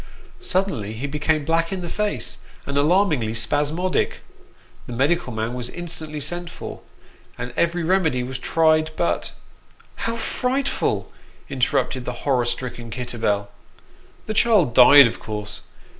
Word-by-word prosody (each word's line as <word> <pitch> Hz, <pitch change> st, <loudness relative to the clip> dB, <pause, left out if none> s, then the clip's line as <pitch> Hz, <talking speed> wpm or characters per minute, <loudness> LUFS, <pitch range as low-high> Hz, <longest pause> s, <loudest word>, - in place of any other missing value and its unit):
Suddenly 185 Hz, -, -1 dB
he 115 Hz, +5 st, -5 dB
became 150 Hz, +1 st, 0 dB
black 165 Hz, +2 st, +1 dB
in 190 Hz, -1 st, -3 dB
the 175 Hz, -, -5 dB
face, 210 Hz, +4 st, -3 dB, 0.3 s
and 140 Hz, -, -4 dB
alarmingly 150 Hz, -, +2 dB
spasmodic. 150 Hz, +9 st, 0 dB, 0.7 s
The 125 Hz, -, -6 dB
medical 140 Hz, +3 st, +1 dB
man 110 Hz, +1 st, -3 dB
was 125 Hz, -1 st, -4 dB
instantly 160 Hz, -3 st, -5 dB
sent 175 Hz, +4 st, -4 dB
for, -, -, -8 dB, 0.6 s
and 125 Hz, -, -5 dB
every 170 Hz, 0 st, +1 dB
remedy 160 Hz, -7 st, +2 dB
was 125 Hz, 0 st, -5 dB
tried, 155 Hz, +2 st, +3 dB
but 170 Hz, -, -1 dB, 0.3 s
" -, -, -30 dB
How 230 Hz, -, -1 dB
frightful! 260 Hz, +4 st, -1 dB, 0.2 s
" -, -, -28 dB
interrupted 130 Hz, -1 st, 0 dB
the 125 Hz, -, -3 dB
horror 130 Hz, -4 st, +2 dB
stricken 120 Hz, -1 st, -4 dB
Kitterbell. 110 Hz, -4 st, -1 dB, 0.4 s
" -, -, -29 dB
The 215 Hz, -, -3 dB
child 210 Hz, -, +4 dB
died, 140 Hz, +3 st, +9 dB
of 115 Hz, -, -2 dB
course. 105 Hz, -1 st, -5 dB
150 Hz, 145 wpm, -22 LUFS, 125-175 Hz, 0.7 s, died